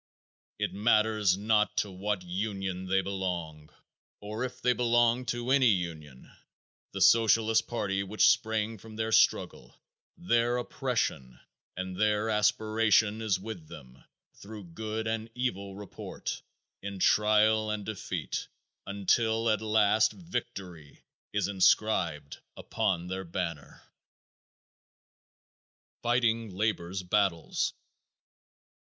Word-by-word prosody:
It - - -2
matters 105 -2 +2
not 105 +1 +1
to 100 - 0
what 95 +1 -3
union 95 0 -4
they 95 +1 +2
belong, 90 -6 -4 0.5
or 105 +3 -5
if 130 - -5
they 125 - +2
belong 120 0 +2
to 120 +1 -2
any 135 -2 +5
union, 80 - -3 0.6
the - - -5
Socialist 115 0 +4
party 100 -5 -1
which 100 +2 +2
sprang 110 0 +1
from 110 +2 -12
their 110 0 -2
struggle, - - +1 0.4
their 120 -8 +1
oppression, 115 - -2 0.4
and 95 0 -5
their 105 +1 +2
aspiration, 110 0 +2
is 105 -4 0
with 95 -6 -8
them 65 -3 -13 0.3
through 105 0 -10
good 110 +2 -4
and 110 0 -3
evil 100 -6 -3
report, 100 -1 -7 0.4
in 100 0 -6
trial 110 +2 +3
and 105 -1 -3
defeat, 95 -7 -4 0.4
until 110 +3 +1
at 110 -1 0
last 110 0 +3
victory 95 - -7 0.3
is 105 -2 0
inscribed 90 -6 +1 0.2
upon 85 -2 -1
their 95 +1 -4
banner. 85 -4 -5 2.2
_Fighting 115 -2 +1
Labor's 95 -2 -2
Battles. 90 -3 0
105 Hz, 110 wpm, -29 LUFS, 95-110 Hz, 2.2 s, any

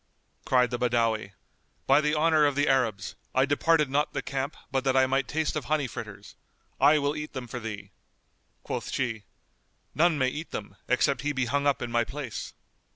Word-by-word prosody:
Cried 125 -2 +3
the 120 - -2
Badawi, 115 -4 0 0.5
"By 135 +2 +5
the 150 +1 +1
honour 155 -1 +4
of 145 - -1
the 145 +1 +2
Arabs, 115 -8 +1 0.2
I 130 +1 +4
departed 150 +2 +2
not 145 +3 0
the - - -3
camp 135 +2 -3
but 135 -1 0
that 135 -1 +2
I 130 - +6
might 135 +1 0
taste 155 0 -1
of 150 -5 -3
honey 150 0 +1
fritters! 125 - -8 0.4
I 145 +3 +6
will 145 0 0
eat 150 0 -6
them 130 -3 -5
for 125 +1 -6
thee." 105 -3 -7 0.7
Quoth - - -4
she, 115 -5 -2 0.7
"None 165 0 +3
may 130 -2 +2
eat 155 +5 -6
them, 100 -2 -6
except 130 +3 +2
he 150 0 -1
be 130 -2 0
hung 140 +3 0
up 140 - +1
in 120 - -5
my 120 0 +2
place." 135 -2 -6
135 Hz, 195 wpm, -27 LUFS, 120-150 Hz, 0.7 s, I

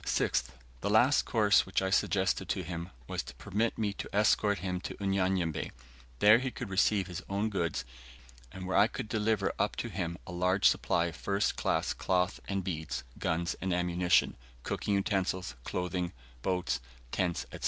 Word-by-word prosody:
6th. - - +1 0.3
The 100 - -2
last 120 +7 +5
course 105 -5 +4
which 95 - +1
I 95 0 -1
suggested 95 -1 +1
to 95 - -1
him, 85 +1 -5 0.2
was - - -2
to 65 -1 -11
permit 105 - -1
me 105 -2 0
to - - -6
escort 105 0 +3
him 90 +1 -3
to - - -5
Unyanyembe, 95 -4 0 0.5
where 105 - +7
he 130 0 -2
could 125 -5 -7
receive 100 0 +3
his 90 0 -6
own 100 +3 0
goods, 85 -5 -1 0.7
and 95 +2 -7
where 95 - -1
I 100 +2 +6
could 120 -1 -5
deliver 105 -2 +1
up - - +1
to - - -3
him 85 -2 -3
a - - -8
large 90 +2 +3
supply 85 - +2
of 85 - -4
first 100 +1 0
class - - 0
cloth 90 0 0
and 100 -1 -1
beads, 80 -5 -3 0.2
guns 85 0 0
and 95 - -1
ammunition, 90 0 +2 0.3
cooking 100 - -1
utensils, 95 -4 0
clothing, 90 -1 -2 0.3
boats, 90 +4 0 0.3
tents, 90 -3 0
&c. - - -7
95 Hz, 175 wpm, -31 LUFS, 90-100 Hz, 0.7 s, where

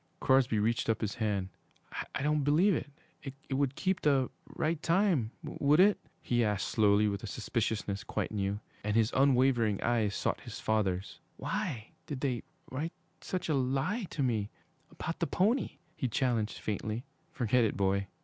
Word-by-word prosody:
Crosby 130 -4 +3
reached 115 +2 +1
up 115 - +1
his 105 -2 -1
hand. 100 -4 -1 0.7
'I - - -1
don't 150 0 +2
believe 165 +8 +4
it 140 -2 -7 0.2
would 135 0 +1
keep 190 -1 0
the 135 -4 +2 0.2
right 160 0 -1
time 170 - +2
would 145 +3 +2
it?' 200 +2 +6 0.2
he 120 -1 +2
asked 105 -3 0
slowly, 105 -1 +4
with 100 -1 -2
a - - -6
suspiciousness 105 -2 -2
quite - - -3
new. 100 -1 -1 0.2
And 105 0 0
his 115 -1 +3
unwavering 130 -6 +3
eyes 110 -4 +1
sought - - -1
his - - -8
father's. 100 -3 -1 0.2
'Why 110 -3 -3 0.2
did 140 -4 -5
they 125 -5 0 0.3
write 155 +6 -3 0.3
such 185 0 -3
a 155 - +1
lie 140 - 0
to 145 - -2
me 110 -5 0 0.4
about 165 - -5
the 170 - +1
pony?' 205 - +1 0.2
he 130 - -1
challenged 115 -3 0
faintly. 110 +3 -3 0.3
'Forget 125 -3 +2
it, 110 - 0
boy!' 100 0 +1
125 Hz, 160 wpm, -31 LUFS, 105-145 Hz, 0.7 s, it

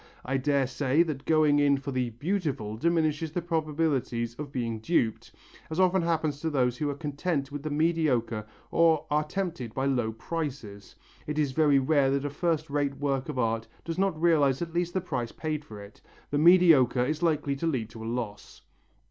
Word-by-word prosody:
I 130 +1 0
dare 140 0 +1
say 135 +4 +2
that 150 -5 -5
going 155 -2 +4
in 140 -1 +4
for 140 +1 -5
the 125 -2 -1
beautiful 140 - -2
diminishes 160 +2 0
the 175 - -1
probabilities 150 -8 -1
of 145 -2 -6
being 115 -4 -3
duped, 110 -3 0 0.4
as 160 +2 -3
often 185 0 +4
happens 160 -4 -1
to 160 - -2
those 125 -5 +1
who 150 +1 -1
are 140 - -3
content 145 -1 -2
with 145 0 -5
the 155 - -4
mediocre 145 -9 0 0.2
or 160 -2 +3
are 150 +1 +2
tempted 155 - -4
by 135 - -1
low 125 -5 0
prices. 120 -6 -6 0.3
It 150 0 -3
is 145 -3 +1
very 145 0 +4
rare 135 0 +3
that 140 +1 0
a 145 - -2
first 160 0 -1
rate 140 -1 -1
work 140 0 -1
of 145 - -4
art 115 -2 0 0.2
does 165 +1 -4
not 190 -5 +1
realize 150 -6 +3
at 165 -1 -7
least 175 +1 -1
the 185 - +1
price 125 -9 -3
paid 155 -1 -4
for 110 -7 -11
it. 100 0 -13 0.3
The 145 - +1
mediocre 160 -8 +6
is 155 +4 -2
likely 150 -4 +1
to 165 - -2
lead 120 -8 -2
to 110 -1 -9
a - - -6
loss." 115 -4 -5
145 Hz, 195 wpm, -28 LUFS, 130-160 Hz, 0.4 s, mediocre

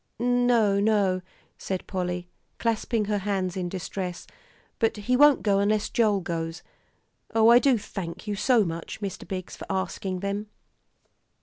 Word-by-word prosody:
"No 240 -4 +3
no," 200 -3 +2 0.4
said 190 -1 -4
Polly, 180 -2 -3 0.3
clasping 225 -1 0
her 205 0 0
hands 190 -2 -1
in 180 -2 -2
distress, 180 0 -5 0.5
"but 225 -1 +1
he 240 +5 0
won't 290 +1 +6
go 200 -2 +3
unless 210 +1 +1
Joel 210 -4 +2
goes. 165 -1 -4 0.7
Oh, 225 0 +6
I 240 +1 +8
do 260 -1 +3
thank 185 -4 -6
you 210 - -2
so 230 0 +3
much, 165 +3 -5
Mr. 195 -3 -5
Biggs, 185 -1 -5
for - - -9
asking 190 -1 -2
them." 200 +2 -3
200 Hz, 145 wpm, -26 LUFS, 185-220 Hz, 0.7 s, I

